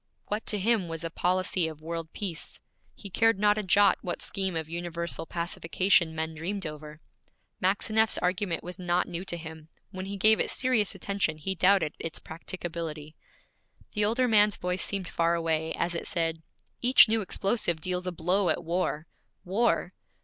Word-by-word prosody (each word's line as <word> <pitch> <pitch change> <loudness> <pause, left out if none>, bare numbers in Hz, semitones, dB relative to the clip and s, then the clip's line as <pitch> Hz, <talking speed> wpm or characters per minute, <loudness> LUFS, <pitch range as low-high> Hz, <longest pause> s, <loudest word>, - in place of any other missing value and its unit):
What 210 +2 -3
to 210 - +1
him 205 -2 +2
was 165 0 -5
a 165 - -3
policy 180 0 +1
of 155 -2 -8
world 165 0 -5
peace? 185 -6 -5 0.4
He 200 - -10
cared 225 +1 +3
not 210 +1 +3
a - - +1
jot 200 0 +4
what 175 - -4
scheme 190 -3 -1
of 160 -1 -2
universal 170 0 -3
pacification 170 0 +1
men 160 0 -2
dreamed 180 +5 -4
over. 150 0 -8 0.6
Maxineff's 215 +3 +3
argument 180 -1 -1
was 180 +2 -7
not 180 0 +1
new 175 0 -4
to 175 - -2
him; 160 -1 -10 0.2
when 190 -1 -6
he 200 0 -5
gave 215 +2 +5
it - - +1
serious 250 -6 +1
attention 200 -6 -1
he 175 +5 -3
doubted 185 -3 +3
its 165 - -4
practicability. 165 -2 -6 0.8
The 210 - +1
older 235 +5 +2
man's 210 -2 +4
voice 180 +1 -2
seemed 195 -3 -1
far 170 +1 +1
away, 160 -1 0
as 175 - -1
it 170 - -3
said, 165 -1 -1 0.4
'Each 245 0 +7
new 220 0 +1
explosive 195 -3 0
deals 180 +2 -3
a - - 0
blow 180 +3 +1
at - - 0
war, 165 -2 -1 0.4
war!' 215 +6 +1
180 Hz, 170 wpm, -28 LUFS, 165-200 Hz, 0.8 s, Each